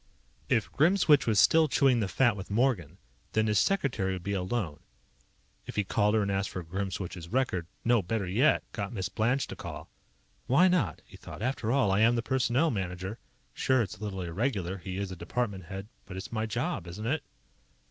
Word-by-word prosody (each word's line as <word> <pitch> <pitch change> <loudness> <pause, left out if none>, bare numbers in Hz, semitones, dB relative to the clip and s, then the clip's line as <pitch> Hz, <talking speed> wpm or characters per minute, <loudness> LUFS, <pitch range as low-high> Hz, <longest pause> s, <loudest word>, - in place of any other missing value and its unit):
If 115 - +1
Grimswitch 160 -2 +4
was 110 -3 +3
still 160 +7 +6
chewing 135 -3 +3
the 105 - 0
fat 120 +2 +2
with 95 -1 -8
Morgan, 100 - 0 0.4
then 110 0 +2
his 105 -1 +3
secretary 125 - +1
would 90 -2 -6
be 100 +1 -2
alone 95 -4 -2 0.9
If - - -7
he 105 - +2
called 105 +2 +2
her 110 - +3
and 100 - -1
asked 100 +1 -1
for 90 - -5
Grimswitch's 90 -1 -4
record 95 -8 0 0.2
no, 120 -2 +4
better 100 +3 -2
yet, 120 +11 +3
got 100 +1 -4
Miss 95 -3 -2
Blanche 120 +7 +1
to - - -8
call - - -8 0.6
Why 145 +9 +5
not? 145 - 0
he - - -14
thought. - - -10
_After 120 -2 -1
all, 130 -7 +3
I 95 - +2
am 115 +2 +5
the 115 - -1
Personnel 130 +5 +2
Manager. 95 +1 -4 0.3
Sure, 130 -2 +2
it's 95 - -7
a - - -8
little 95 -3 -4
irregular. 95 0 -2
He 95 +1 -5
IS 100 -1 -3
a - - -5
department 95 +2 -3
head. 95 +2 -7 0.2
But 95 -2 -7
it's 95 - -7
my 110 -1 -1
job, 120 - -2
isn't 100 +6 -6
it? 145 +6 0
105 Hz, 200 wpm, -29 LUFS, 95-125 Hz, 0.9 s, still